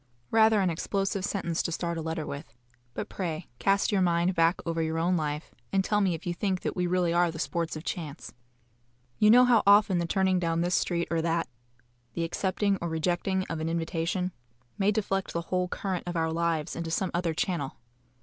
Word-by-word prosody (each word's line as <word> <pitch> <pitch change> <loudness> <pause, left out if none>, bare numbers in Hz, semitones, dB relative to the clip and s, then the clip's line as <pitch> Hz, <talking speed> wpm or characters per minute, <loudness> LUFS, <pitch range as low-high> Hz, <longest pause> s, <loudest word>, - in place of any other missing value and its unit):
Rather 220 -2 +5
an 185 -2 +2
explosive 195 +3 -1
sentence 185 -5 -1
to - - -3
start 170 0 -2
a 165 - -3
letter 160 -1 -3
with; 140 -5 -7 0.4
but - - -3
pray 165 -3 -4
cast 200 +2 +2
your 200 -2 +2
mind 175 +1 +2
back 165 +1 +3
over 165 -1 -1
your 160 0 -1
own 175 +3 +2
life, 150 -1 -3 0.2
and 195 -1 +2
tell 210 -1 +2
me 185 -4 +2
if 165 - -10
you 175 - -1
think 185 +1 -1
that - - -3
we 180 -1 0
really 175 -1 +1
are 175 0 +3
the 160 - -6
sports 160 +3 -2
of 155 - -6
chance. 160 -4 -5 0.9
You 210 - +6
know 250 +3 +8
how 240 -3 +5
often 200 -3 +6
the 170 - -1
turning 190 0 +2
down 165 -1 0
this 175 +1 0
street 170 -1 +1
or 165 -1 +1
that, 165 -1 0 0.7
the 170 - -1
accepting 195 +4 0
or 170 - -2
rejecting 175 +4 0
of 165 - -4
an 160 +1 -2
invitation, 170 +2 -1 0.4
may 200 +1 +2
deflect 195 -2 -1
the 170 - -1
whole 180 0 +2
current 185 -1 -3
of 175 - -3
our 160 0 0
lives 165 -2 -1
into 170 -1 -4
some 185 +3 -1
other 170 -2 0
channel. 170 -5 -2
175 Hz, 205 wpm, -28 LUFS, 165-190 Hz, 0.9 s, know